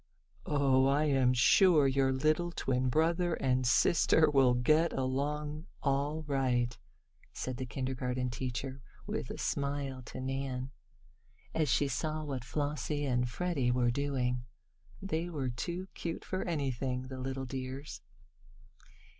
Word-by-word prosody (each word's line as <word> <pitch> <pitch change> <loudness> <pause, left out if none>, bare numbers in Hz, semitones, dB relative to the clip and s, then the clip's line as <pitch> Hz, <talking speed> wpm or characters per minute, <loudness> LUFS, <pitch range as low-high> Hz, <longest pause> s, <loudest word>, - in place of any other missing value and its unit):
"Oh, 135 -2 +3
I 140 +2 +3
am 135 -4 +3
sure 150 - +5
your 135 0 +2
little 155 +6 +1
twin 130 -5 0
brother 165 +4 +2
and 130 -1 +1
sister 155 +4 +4
will 130 -3 +5
get 155 +6 +3
along 150 +4 -2 0.2
all 145 +3 0
right," 125 -4 0 0.6
said 130 -1 -4
the 130 -1 -4
kindergarten 125 -1 -2
teacher, 130 +2 -4 0.2
with - - -4
a - - -5
smile 140 -2 -2
to - - -8
Nan, 130 0 -3 0.8
as 155 -3 +1
she 140 +3 +3
saw 155 +4 -2
what 135 -5 -4
Flossie 145 +2 -2
and 125 -2 +1
Freddie 145 -2 -1
were 120 -1 +2
doing. 125 -2 -1 0.6
"They 170 -3 -1
are 145 -7 -3
too 170 +10 -4
cute 165 -1 -5
for 185 - -3
anything 135 -5 -2
the 130 0 -7
little 135 +1 -3
dears!" 130 +2 -6
135 Hz, 130 wpm, -32 LUFS, 130-150 Hz, 0.8 s, sure